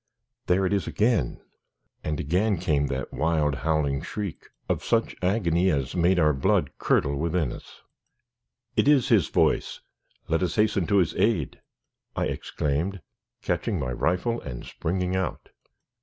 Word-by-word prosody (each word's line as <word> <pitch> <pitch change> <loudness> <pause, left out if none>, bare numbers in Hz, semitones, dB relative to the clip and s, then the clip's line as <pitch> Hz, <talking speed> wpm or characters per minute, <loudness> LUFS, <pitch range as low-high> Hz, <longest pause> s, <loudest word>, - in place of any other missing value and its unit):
There 95 +2 +3
it 95 - +1
is 100 - 0
again!" 110 - +1 0.6
And 75 -1 -2
again 95 +7 +1
came 75 -4 +1
that 65 -1 -4
wild, 75 -3 +1
howling 75 -2 0
shriek 100 -2 -5 0.2
of - - -1
such 115 0 +1
agony 90 -2 +2
as 70 -3 -1
made 90 +1 +3
our 75 -3 +4
blood 65 - +1
curdle 70 0 +2
within 80 -2 0
us. - - -13 0.9
"It - - +2
is 140 -3 +4
his 110 - +4
voice! - - +1 0.5
Let 80 +1 +1
us 90 - -1
hasten 105 -5 +2
to 100 - +3
his 85 -4 +2
aid," 105 - 0 0.5
I - - 0
exclaimed, 80 +7 -2 0.4
catching - - -1
my 60 - -2
rifle, 90 - 0
and - - -7
springing 90 +2 -2
out. 95 0 -3
85 Hz, 145 wpm, -26 LUFS, 75-100 Hz, 0.9 s, our